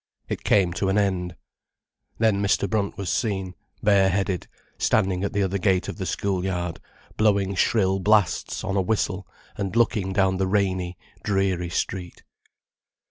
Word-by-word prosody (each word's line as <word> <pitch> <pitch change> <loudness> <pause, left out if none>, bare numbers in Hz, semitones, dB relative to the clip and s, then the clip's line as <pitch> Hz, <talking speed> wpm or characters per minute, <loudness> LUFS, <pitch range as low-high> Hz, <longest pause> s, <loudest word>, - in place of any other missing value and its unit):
It - - -4
came 95 -4 +3
to 95 +3 -1
an 95 - +2
end. 90 -4 0 0.8
Then 110 -3 +2
Mr. 100 0 +2
Brunt 100 +1 -1
was 95 -3 -2
seen, 95 -5 -1 0.3
bare 100 -2 +5
headed, 95 -1 -1 0.3
standing 95 -1 +1
at 100 - -1
the 100 - +1
other 95 +1 -1
gate 95 0 +2
of - - -5
the - - -3
school 95 -3 -1
yard, 90 -3 -2 0.4
blowing 100 -3 +2
shrill 95 -1 +2
blasts 105 0 +2
on 100 - -2
a 95 - +3
whistle 95 -1 -1 0.3
and 100 0 -3
looking 115 -5 +2
down 95 -1 +2
the 95 0 0
rainy, 95 -3 0 0.3
dreary 95 -3 0
street. 90 +1 -4
95 Hz, 155 wpm, -24 LUFS, 95-100 Hz, 0.8 s, bare